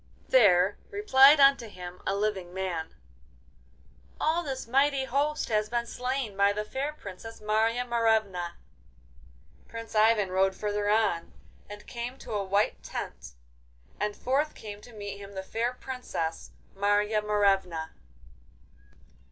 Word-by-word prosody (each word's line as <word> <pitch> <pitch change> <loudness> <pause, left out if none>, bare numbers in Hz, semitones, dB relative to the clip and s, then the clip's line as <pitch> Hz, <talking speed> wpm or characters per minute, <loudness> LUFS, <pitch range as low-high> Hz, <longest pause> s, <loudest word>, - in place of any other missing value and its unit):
There 200 -5 +5
replied 300 -9 +6
unto 275 -4 +5
him 180 -3 -9
a 195 - +1
living 195 -4 -2
man: 175 -4 -3 1.2
'All 320 +2 +1
this 270 -5 -4
mighty 275 +2 +2
host 290 +4 0
has 215 -1 +1
been 235 0 -1
slain 250 -3 -3
by 200 +1 +3
the 210 +1 -3
fair 270 +7 -3
Princess 225 -4 -10
Marya 220 +3 +1
Morevna.' 220 -7 +1 1.1
Prince 230 -1 -8
Ivan 215 -3 +3
rode 190 +1 +2
further 205 0 -1
on, 210 -6 +1 0.4
and 205 0 -10
came 240 +1 -6
to - - -10
a 205 -2 -1
white 200 +2 0
tent, - - -7 0.7
and 210 0 -1
forth 285 +4 0
came 205 -1 -9
to 245 - -14
meet 205 -1 -7
him 200 0 -10
the 190 -1 -5
fair 230 +5 -1
Princess 250 -11 -5 0.3
Marya 205 +2 +2
Morevna. 195 -6 +1
215 Hz, 130 wpm, -28 LUFS, 195-245 Hz, 1.2 s, replied